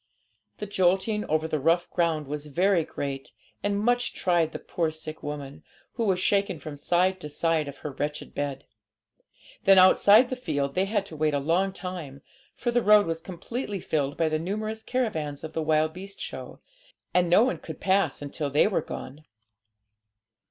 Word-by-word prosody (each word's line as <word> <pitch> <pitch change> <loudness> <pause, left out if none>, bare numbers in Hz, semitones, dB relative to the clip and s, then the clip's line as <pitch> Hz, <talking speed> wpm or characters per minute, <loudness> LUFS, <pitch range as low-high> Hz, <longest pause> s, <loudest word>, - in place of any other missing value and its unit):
The 210 - -4
jolting 195 +2 +1
over 155 +1 0
the 155 -1 -1
rough 165 +5 +2
ground 165 -3 0
was 150 +1 -5
very 175 +3 +2
great, 140 -3 -5 0.3
and 205 0 0
much 245 +3 +1
tried 170 -3 +1
the - - -5
poor 165 -2 -2
sick 155 0 -8
woman, 145 0 -6 0.3
who 230 - -1
was 190 -3 +2
shaken 200 -1 +1
from 150 0 -8
side 180 +5 +1
to 150 - -7
side 160 0 0
of 140 - -8
her 150 - -2
wretched 145 +2 -4
bed. 140 -2 -3 1.0
Then 195 0 +7
outside 205 +6 +7
the 255 - -2
field 145 - -2
they 185 +4 +1
had 205 0 -1
to 165 - -9
wait 150 -1 +1
a - - +1
long 170 +7 +1
time, 175 -8 -7 0.3
for 240 - -1
the 240 0 +2
road 210 -1 +6
was 165 0 -3
completely 200 +4 -5
filled 145 -4 -1
by 165 - +2
the 155 0 0
numerous 215 +5 -3
caravans 160 - -2
of 160 0 -6
the 160 - -1
wild 155 0 +2
beast 195 +3 -9
show, - - -7 0.5
and 180 -1 +3
no 180 +6 +6
one 255 - 0
could - - -9
pass 190 -7 +1
until 145 +1 -3
they 145 +2 +4
were 205 - +1
gone. 145 +4 -8
165 Hz, 180 wpm, -27 LUFS, 150-195 Hz, 1.0 s, Then